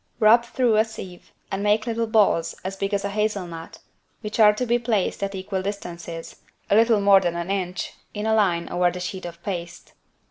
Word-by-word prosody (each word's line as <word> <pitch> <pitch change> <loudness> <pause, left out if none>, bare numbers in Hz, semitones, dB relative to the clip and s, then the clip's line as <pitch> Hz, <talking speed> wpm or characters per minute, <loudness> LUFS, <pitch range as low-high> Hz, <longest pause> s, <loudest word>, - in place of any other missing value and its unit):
Rub 230 +2 +6
through 235 -2 +1
a 215 - +5
sieve 190 -5 -10 0.2
and 195 - -2
make 210 +1 +2
little 230 -1 -1
balls 200 -7 +2
as 190 +1 -3
big 195 +1 -3
as 200 -1 -1
a - - -1
hazel 210 -2 -1
nut, 165 -1 -9 0.4
which 215 0 -5
are 210 -1 +8
to 210 +4 -2
be 240 0 +2
placed 225 -6 -1
at 200 0 -2
equal 190 0 -3
distances 175 -4 -6 0.3
(a - - +6
little 225 0 +5
more 200 -1 +7
than 175 -2 -1
an 170 +2 -3
inch) 185 -2 -3 0.2
in 210 0 -4
a 220 - +2
line 185 -6 +2
over 175 0 +2
the 180 - -6
sheet 185 +1 -5
of 170 0 -11
paste. 175 -3 -6
200 Hz, 210 wpm, -24 LUFS, 180-215 Hz, 0.4 s, are